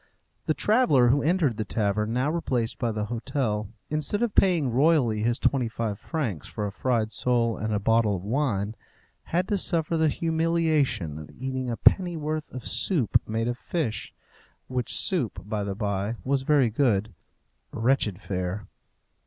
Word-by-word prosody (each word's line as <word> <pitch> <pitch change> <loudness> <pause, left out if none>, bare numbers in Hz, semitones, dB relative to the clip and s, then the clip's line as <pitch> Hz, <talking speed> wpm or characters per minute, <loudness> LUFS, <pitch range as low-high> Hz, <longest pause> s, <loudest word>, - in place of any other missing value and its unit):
The - - +2
traveller 210 - +4
who 140 +3 +3
entered 155 - +1
the 110 - -1
tavern, 105 0 -1
now 130 +5 +1
replaced 125 -8 -1
by 120 -2 0
the 105 -1 -2
hotel, 110 -2 -2 0.2
instead 155 +9 0
of 230 -4 0
paying 170 -9 +3
royally 130 -5 +3
his 120 +2 +1
twenty 130 -4 +1
five 110 -3 -3
francs 120 - -3
for 105 - -4
a 100 - -3
fried 115 0 0
sole 115 0 +1
and 110 0 -3
a 105 - +1
bottle 110 0 +2
of 90 - -6
wine, 110 -3 0 0.5
had 180 +2 0
to 205 -2 +1
suffer 165 -2 0
the 160 -1 +3
humiliation 160 - 0
of 75 - -10
eating 130 0 -4
a 115 - -2
pennyworth 155 -4 +2
of 130 -1 -7
soup 150 - +2
made 115 +1 -1
of 120 0 -3
fish 150 -11 -3 0.6
which 125 -3 -2
soup, 150 - -1
by 105 -1 -2
the 100 -1 -3
bye, 100 +1 -2
was 135 0 +1
very 135 -4 +3
good. 110 -4 +1 0.6
Wretched 115 -5 +1
fare! 90 +1 -3
120 Hz, 160 wpm, -26 LUFS, 105-150 Hz, 0.6 s, traveller